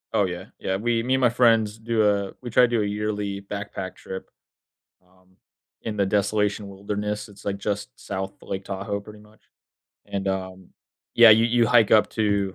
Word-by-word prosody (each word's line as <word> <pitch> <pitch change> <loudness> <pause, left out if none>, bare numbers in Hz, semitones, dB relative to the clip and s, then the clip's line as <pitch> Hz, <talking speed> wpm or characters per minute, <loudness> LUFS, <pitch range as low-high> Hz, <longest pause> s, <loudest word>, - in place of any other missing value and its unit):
Oh, 100 - +3
yeah. 90 0 -5
Yeah, 95 - -1
we 115 +2 0
me 130 +2 0
and 130 - 0
my 120 - +5
friends 115 -3 +3
do 110 -1 +1
a 100 -1 -1
we 125 - -6
try 120 +2 +5
to - - +6
do 120 -2 0
a - - 0
yearly 105 -1 -3
backpack 100 -1 -6
trip, 95 0 -8 0.8
um, 95 0 -28 0.5
in 110 -2 -5
the 100 - +2
desolation 105 +1 0
wilderness. 105 +2 -4
It's, 100 -1 -16
like, 100 -1 -2
just 105 +4 -3
South 95 0 -5
Lake 95 0 -5
Tahoe, 100 +1 -3
pretty 105 +1 -13
much. 105 0 -20 0.7
And, 100 -1 -3
um 95 -1 -4 0.5
yeah, 115 -1 +9
you 110 +1 +7
you 120 0 +3
hike 115 -2 +4
up 105 -1 +5
to, 100 -3 0
105 Hz, 185 wpm, -24 LUFS, 100-110 Hz, 0.8 s, yeah